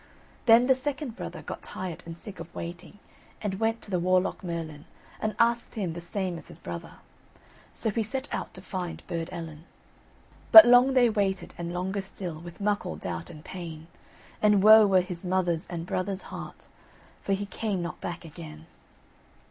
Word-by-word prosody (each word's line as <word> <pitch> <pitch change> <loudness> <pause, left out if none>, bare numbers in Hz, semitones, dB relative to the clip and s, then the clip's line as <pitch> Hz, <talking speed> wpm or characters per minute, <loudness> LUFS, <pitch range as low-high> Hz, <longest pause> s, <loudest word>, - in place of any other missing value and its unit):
Then 230 +2 +8
the 265 - +6
second 265 -2 -4
brother - - -7
got - - -6
tired 180 -3 -6
and 165 0 -7
sick 200 -1 -9
of 165 +1 -9
waiting, 175 +3 -7 0.4
and 205 -3 -2
he 190 - -5
went 225 0 0
to 205 - -10
the 180 - +1
Warlock 185 +2 +1
Merlin 165 -4 -5 0.3
and 215 0 -2
asked 235 0 +2
him 190 -7 -2
the 170 - -6
same 180 -1 -3
as 150 - -14
his - - -9
brother. 85 -1 -7 0.8
So 220 - -2
he 225 - 0
set 260 +6 -3
out - - -3
to - - -9
find 180 -4 -5
Burd 165 0 -4
Ellen. 165 -2 -7 0.9
But 330 - +13
long 245 +2 +6
they 250 -2 +6
waited, 195 -3 -1
and 170 0 -5
longer 190 +3 -2
still, 180 -4 -6
With 170 +1 -11
muckle 205 -3 -1
doubt 85 -2 -5
and 150 0 -12
pain, 165 -4 -7 0.6
And 210 -2 +4
woe 215 0 +9
were 190 -2 +5
his 180 -1 -7
mother's 180 -2 0
and 170 -1 -5
brother's 185 +2 -2
heart, - - -8 0.6
For 195 - 0
he 200 +1 -1
came 200 -3 -2
not 170 - -6
back 175 0 -5
again. 80 - -10
185 Hz, 180 wpm, -28 LUFS, 170-210 Hz, 0.9 s, But